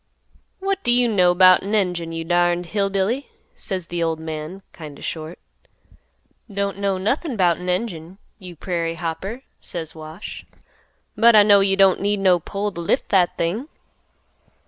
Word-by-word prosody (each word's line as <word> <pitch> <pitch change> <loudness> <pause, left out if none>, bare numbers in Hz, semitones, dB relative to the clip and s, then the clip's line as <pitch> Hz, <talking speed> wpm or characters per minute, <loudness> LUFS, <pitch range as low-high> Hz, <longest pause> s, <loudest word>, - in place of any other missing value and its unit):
"'What 390 0 -2
do 240 - +2
you 245 0 +4
know 180 -5 +3
'bout 185 0 +7
an 205 +3 -2
engine, 180 -5 -1
you 165 0 -4
darned 175 +1 +1
hill 200 +2 -1
billy,' 200 +8 -1 0.3
says 185 -5 -4
th' 170 0 -4
old 165 -1 -1
man, 160 +4 -6
kind 150 -4 -10
o' - - -14
short. 160 +1 -5 1.1
"'Don't 200 0 -2
know 200 -1 0
nothin' 250 - -1
'bout 175 -3 +3
an 180 0 -5
engine, 180 -2 -3 0.2
you 180 -3 -10
prairie 165 0 -3
hopper,' 175 +9 -5 0.2
says 165 -3 -5
Wash, 160 +4 -9 0.7
'but 230 +1 +6
I 210 - +8
know 205 -1 +6
you 195 0 +3
don't 195 -1 +4
need 205 0 0
no 185 -2 +4
pole 200 +5 -4
t' 170 - -7
lift 165 - 0
that 185 -3 +2
thing. 200 - -2
185 Hz, 170 wpm, -21 LUFS, 170-200 Hz, 1.1 s, I